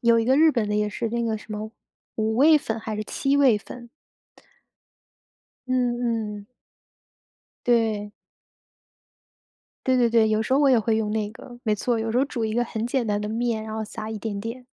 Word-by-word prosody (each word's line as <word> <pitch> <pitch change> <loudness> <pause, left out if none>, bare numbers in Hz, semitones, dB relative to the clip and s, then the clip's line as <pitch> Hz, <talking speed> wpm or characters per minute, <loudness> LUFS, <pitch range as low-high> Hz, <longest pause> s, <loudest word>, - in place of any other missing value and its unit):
有 235 -1 +4
一 225 - +1
个 260 +2 +3
日 315 +2 +6
本 230 -7 -1
的 210 - -1
也 210 0 +1
是 225 +2 -3
那 235 +1 -2
个 225 -1 0
什 215 - -13
么 215 +1 -5 0.5
五 220 0 0
味 305 +4 +6
粉 225 -5 -4
还 220 -1 -5
是 215 - -2
七 275 +5 0
味 265 -6 +5
粉。 240 +3 -11 1.8
嗯 240 -4 -1
嗯。 200 - -21 1.2
对。 220 -4 +1 1.7
对 260 -1 +3
对 240 -2 +3
对， 225 -1 +4
有 215 0 +1
时 240 - -2
候 275 - +4
我 285 - +5
也 250 -3 +5
会 220 0 +1
用 215 -1 -1
那 210 -1 -1
个， 240 +1 -12
没 215 -3 +1
错， 235 +3 -1
有 225 0 -2
时 245 - +2
候 270 - +3
煮 235 -5 -3
一 220 - -2
个 240 +2 +1
很 225 -1 -3
简 245 -1 -1
单 205 -1 0
的 210 - -3
面， 225 0 -1
然 220 0 -6
后 220 - -2
撒 220 0 -6
一 220 - -4
点 205 -1 -4
点。 230 +4 -6
225 Hz, 220 characters per minute, -24 LUFS, 215-245 Hz, 1.8 s, 日